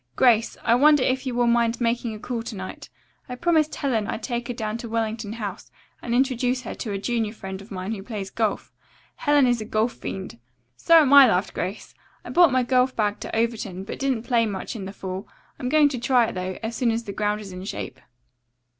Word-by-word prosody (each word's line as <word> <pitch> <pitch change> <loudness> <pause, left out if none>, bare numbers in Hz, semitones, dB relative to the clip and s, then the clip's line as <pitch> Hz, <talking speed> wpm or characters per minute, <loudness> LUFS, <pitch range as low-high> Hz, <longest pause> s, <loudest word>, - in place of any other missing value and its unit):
Grace, 235 -3 +3
I 230 - +3
wonder 290 +2 +5
if 260 +1 0
you 250 - -2
will 245 0 +2
mind 235 0 +2
making 235 -1 -1
a - - -9
call 240 +1 -4
to 230 -1 -7
night. 190 -1 -8 0.4
I 250 - -4
promised 315 +2 +2
Helen 230 -8 -1
I'd - - -4
take 240 -2 -3
her 245 - -3
down 220 -1 -3
to 235 - -7
Wellington 220 -1 -2
House 210 -3 -6 0.3
and 235 0 -2
introduce 255 -1 +1
her - - -5
to 220 - -5
a 200 - -2
junior 220 +1 -1
friend 190 -3 -7
of 200 - -14
mine 185 +1 -5
who 210 -3 -4
plays 200 -2 -6
golf. 220 -3 -1 0.5
Helen 290 -2 +3
is 245 -2 +1
a - - -5
golf 220 +2 0
fiend." 190 -11 -7 0.4
"So 335 - +5
am 290 -4 +5
I," 280 -2 +10
laughed 185 -2 0
Grace. 185 +4 -5 0.3
"I - - -6
brought 345 -4 +6
my 255 0 +2
golf 255 +1 +2
bag 210 -1 0
to - - -5
Overton, 220 -5 -1
but 195 - -7
didn't 265 -5 0
play 235 -3 +2
much 200 +3 -5
in 200 -4 -5
the 190 - -6
fall. 190 0 -6 0.3
I'm 250 - -2
going 300 +1 +5
to 260 -4 -4
try 245 0 +3
it, - - -4
though, 185 0 -4
as 225 +1 -3
soon 245 0 +1
as 230 +1 -1
the 200 - -6
ground 210 +1 0
is 200 -2 -9
in 180 0 -7
shape." - - -6
230 Hz, 230 wpm, -24 LUFS, 210-250 Hz, 0.5 s, I